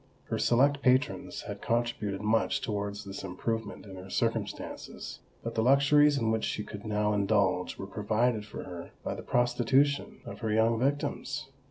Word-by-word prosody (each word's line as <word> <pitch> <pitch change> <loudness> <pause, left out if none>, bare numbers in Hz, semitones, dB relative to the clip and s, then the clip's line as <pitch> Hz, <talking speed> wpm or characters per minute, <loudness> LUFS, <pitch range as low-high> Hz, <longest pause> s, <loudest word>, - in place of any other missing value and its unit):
Her - - -1
select 140 +4 +3
patrons 130 +2 +1
had - - -7
contributed 115 -4 -1
much 115 +5 +2
towards 105 -4 -3
this 95 0 -6
improvement 105 +4 -3
in 95 -2 -9
her 95 +1 -9
circumstances; - - -3 0.2
but 115 - -3
the 110 - +1
luxuries 140 +3 +5
in 115 -4 +1
which 110 -1 0
she 105 - -1
could 105 0 -8
now 105 0 +1
indulge, 100 -2 +1
were - - -5
provided 105 +3 0
for 105 - -7
her 85 -1 -8
by - - -2
the - - -6
prostitution 130 +4 +2
of - - -8
her 110 -2 -1
young 110 +1 +3
victims. 140 +1 -1
110 Hz, 165 wpm, -30 LUFS, 105-130 Hz, 0.2 s, luxuries